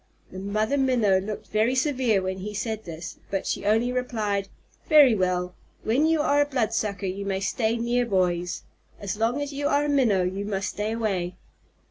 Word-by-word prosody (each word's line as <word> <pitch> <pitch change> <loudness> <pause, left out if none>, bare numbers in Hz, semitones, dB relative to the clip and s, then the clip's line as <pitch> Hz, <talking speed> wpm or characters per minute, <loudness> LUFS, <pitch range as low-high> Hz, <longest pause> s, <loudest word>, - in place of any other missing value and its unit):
The 185 - -7
Mother 215 +7 0
Minnow 235 -8 +3
looked 205 +2 -6
very 220 +4 +2
severe 255 -7 +1
when 190 0 -3
he 210 +2 -6
said 220 +1 -3
this, 165 +1 -8
but 195 -1 -2
she 200 - -2
only 225 +4 +3
replied, 215 -6 -1 0.4
"Very 295 -6 +7
well. 180 -2 0 0.3
When 260 +8 +2
you 320 -1 +2
are 290 0 +3
a - - +3
Bloodsucker 220 -6 -1
you 190 +2 -3
may 195 -1 -1
stay 220 +3 0
near 240 +1 0
boys. 180 -3 0 0.4
As 200 -1 -3
long 225 +6 0
as 285 0 -6
you 285 +1 -1
are 285 +1 +2
a - - -1
Minnow, 235 -10 +3
you 190 +2 -2
must 200 -1 -2
stay 210 +2 -3
away." 195 -6 -2
215 Hz, 185 wpm, -25 LUFS, 195-250 Hz, 0.4 s, Very